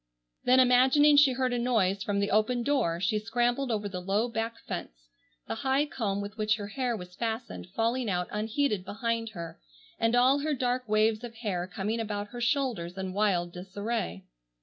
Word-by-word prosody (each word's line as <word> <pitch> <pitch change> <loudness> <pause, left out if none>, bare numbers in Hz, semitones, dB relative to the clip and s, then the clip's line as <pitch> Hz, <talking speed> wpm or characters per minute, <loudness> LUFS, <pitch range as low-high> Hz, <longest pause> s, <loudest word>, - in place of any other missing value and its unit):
Then 255 +1 +5
imagining 260 +4 +6
she 285 -2 +6
heard 255 0 0
a 245 - 0
noise 205 -6 +1
from 200 0 -1
the 200 - 0
open 230 +4 +2
door, 235 -12 +1
she 210 +3 +1
scrambled 240 +4 0
over 210 -3 -1
the 185 -2 -5
low 200 +5 +1
back 230 0 -3
fence, - - -7 0.4
the - - -2
high 270 +1 +2
comb 205 -8 -2
with 205 +2 -8
which 215 +1 +2
her 205 -2 -6
hair 245 -1 -1
was 180 -2 -10
fastened 220 - -4
falling 230 +1 0
out 180 -2 -1
unheeded 215 0 0
behind 230 +2 -2
her, 170 - -8 0.4
and 225 +1 +2
all 255 +3 +5
her 300 +1 -1
dark 250 -2 -1
waves 215 +1 +2
of 235 -1 -7
hair 195 -6 -3
coming 200 +5 -3
about 205 -2 -3
her 240 +2 -7
shoulders 235 -9 -1
in 190 -1 -4
wild 185 -4 +1
disarray. 185 - -4
220 Hz, 185 wpm, -29 LUFS, 200-245 Hz, 0.4 s, imagining